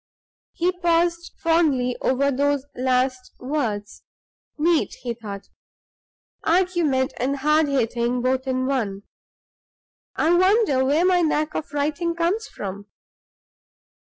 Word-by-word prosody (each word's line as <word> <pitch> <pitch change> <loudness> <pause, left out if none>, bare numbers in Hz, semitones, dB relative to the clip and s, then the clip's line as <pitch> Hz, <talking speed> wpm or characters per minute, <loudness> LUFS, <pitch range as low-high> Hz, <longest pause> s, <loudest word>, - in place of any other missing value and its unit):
He 350 +2 +1
paused 340 -1 0
fondly 295 -7 +2
over 275 +2 +1
those 280 0 0
last 255 0 0
words. 235 -7 -3 0.6
"Neat!" 325 +1 +1
he 240 -2 -2
thought. 205 -4 -9 0.9
"Argument 335 -7 +1
and 270 +3 0
hard 300 +2 +3
hitting 240 -2 0
both 260 +1 0
in 255 0 0
one. 215 -8 -2 1.1
I 325 +2 +2
wonder 370 - +3
where 295 +6 +2
my 365 -1 +4
knack 305 -1 0
of 300 - -5
writing 305 +4 -1
comes 355 +7 0
from?" 200 +1 -7
280 Hz, 110 wpm, -23 LUFS, 255-335 Hz, 1.1 s, my